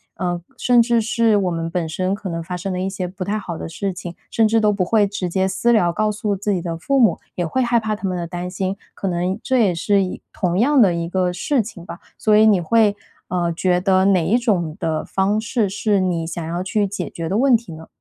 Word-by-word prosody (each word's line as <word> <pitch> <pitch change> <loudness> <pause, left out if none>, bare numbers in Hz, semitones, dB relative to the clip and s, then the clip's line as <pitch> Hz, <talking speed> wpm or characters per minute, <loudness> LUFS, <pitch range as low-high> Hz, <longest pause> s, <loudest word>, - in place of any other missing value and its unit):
呃， 175 -2 -2 0.2
甚 245 -1 +4
至 235 0 +2
是 225 0 +2
我 190 -3 +1
们 165 -1 -3
本 165 -1 -2
身 185 +4 -1
可 200 -2 -6
能 165 -1 -3
发 180 +2 -5
生 180 +2 -4
了 180 - -2
一 190 +1 -1
些 190 -1 -4
不 185 0 -6
太 210 +3 -1
好 175 -5 -5
的 - - -6
事 195 +4 -3
情， 180 -1 -8 0.2
甚 225 -1 +3
至 225 +1 +2
都 210 -1 +3
不 200 -3 0
会 215 +1 +3
直 200 -2 -3
接 190 +2 0
私 235 +5 +2
聊 175 -6 +3
告 215 +5 0
诉 210 0 -2
自 205 +1 -1
己 180 - -1
的 165 -1 -4
父 275 +12 0
母， 235 -5 +4 0.2
也 175 - -1
会 260 +11 -1
害 240 -1 +2
怕 220 -1 -1
他 205 -2 -3
们 185 -1 -2
的 170 - -3
担 175 +1 -5
心， 190 +1 -3 0.2
可 195 - -3
能 180 +3 -1
这 260 - +1
也 190 -5 +2
是 200 +4 +2
一 180 - -6
同 180 0 -1
样 275 +3 +4
的 185 -5 +5
一 170 0 -3
个 180 -1 0
事 275 - +1
情 195 -5 -9
吧， 175 - -9 0.2
所 215 -1 +3
以 215 - +6
你 205 -4 +5
会， 215 +3 +3 0.3
呃， 175 -1 0
觉 180 +1 +1
得 190 -1 +3
哪 185 -4 +3
一 215 +9 +3
种 180 -10 0
的 160 -1 -1
方 195 +2 0
式 230 -1 0
是 205 +1 +1
你 175 -3 0
想 170 0 -5
要 170 +2 -3
去 200 +2 0
解 190 -2 -4
决 165 -1 -5
的 195 +5 0
问 260 0 +5
题 220 -7 -11
呢？ 160 +1 -11
190 Hz, 280 characters per minute, -20 LUFS, 175-215 Hz, 0.3 s, 以